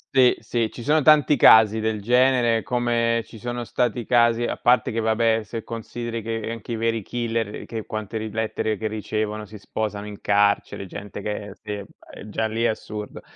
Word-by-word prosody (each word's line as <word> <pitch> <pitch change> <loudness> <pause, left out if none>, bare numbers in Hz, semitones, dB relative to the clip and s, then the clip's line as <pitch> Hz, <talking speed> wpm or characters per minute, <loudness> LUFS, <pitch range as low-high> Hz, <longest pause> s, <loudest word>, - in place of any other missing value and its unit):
Sì, 130 -2 +6
sì, 115 -2 -1
ci 120 - -9
sono 155 +5 +3
tanti 150 -1 +5
casi 110 -1 +7
del 110 -1 -1
genere, 120 0 +3
come 115 -2 0
ci 115 - -13
sono 120 +2 -4
stati 120 0 -1
casi 120 -1 +3
a - - -2
parte 125 +1 +3
che 115 - -2
vabbè 110 0 +2
se 110 +1 -6
consideri 115 0 -5
che 115 0 -4
anche 115 +1 -6
i - - -1
veri 115 0 0
killer, 115 0 -2
ehm, - - -8
che 110 -2 -6
quante 110 0 -4
ri 110 0 -4
lettere 110 0 -2
che 110 - -6
ricevono, 110 0 -3
si 105 - -10
sposano 105 0 -4
in 105 -1 -9
carcere, 100 -1 +1
gente 100 +3 -8
che 105 -1 -4
si 105 - -8
uhm, 100 - -8 0.3
e 105 - -10
già 110 +2 -1
lì 110 +1 -2
è 120 - +4
assurdo. 105 -1 -5
115 Hz, 200 wpm, -23 LUFS, 105-120 Hz, 0.3 s, casi